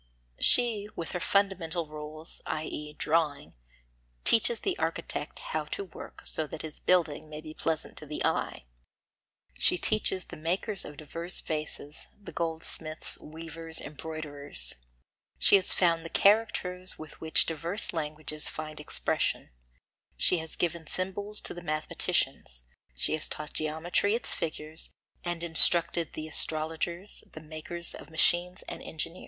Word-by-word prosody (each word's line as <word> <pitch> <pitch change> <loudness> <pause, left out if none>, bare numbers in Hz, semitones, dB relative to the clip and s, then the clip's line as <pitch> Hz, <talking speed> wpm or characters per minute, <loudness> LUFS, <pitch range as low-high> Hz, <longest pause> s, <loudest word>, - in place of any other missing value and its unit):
She 225 -4 +4
with 165 - -4
her 180 - -1
fundamental 180 -4 +1
rules, 155 +1 -6
i.e. 150 -1 -3
drawing, 150 -1 +1 0.7
teaches 230 +1 +6
the 380 - +1
architect - - -1 0.2
how - - 0
to 400 - -3
work - - -10
so 155 - +3
that 155 - -5
his 155 -1 -6
building 160 -4 +2
may 150 0 -5
be 155 0 -8
pleasant 160 0 -1
to 150 - -10
the 150 - -2
eye; - - 0 0.9
she - - +3
teaches 190 -1 +1
the - - -9
makers 185 +5 -1
of 150 - -9
diverse 165 +4 -5
vases, 150 -1 -3
the 205 - -9
goldsmiths, 160 -1 -1
weavers, 160 +1 -5
embroiderers; 145 - -3 0.6
she - - +7
has 190 - +1
found 170 -2 +3
the 165 - -5
characters 190 -3 +3
with 155 -1 -10
which 160 0 +3
diverse 170 +6 0
languages 155 -1 -3
find 155 -1 -5
expression; 150 - +1 0.7
she 170 - +4
has 160 0 -4
given 170 -2 -1
symbols 200 +4 -1
to - - -4
the 175 - -7
mathematicians; 155 - 0 0.3
she 65 - +3
has 155 0 0
taught 150 0 -6
geometry 160 +7 +1
its 240 - -1
figures, 155 0 -4 0.3
and 175 -1 -2
instructed 170 0 +4
the 155 0 -4
astrologers, 160 +4 0
the - - -7
makers 160 +2 -4
of - - -9
machines 175 +3 +3
and - - -6
engineers. 165 +3 -4
160 Hz, 140 wpm, -30 LUFS, 155-180 Hz, 0.9 s, she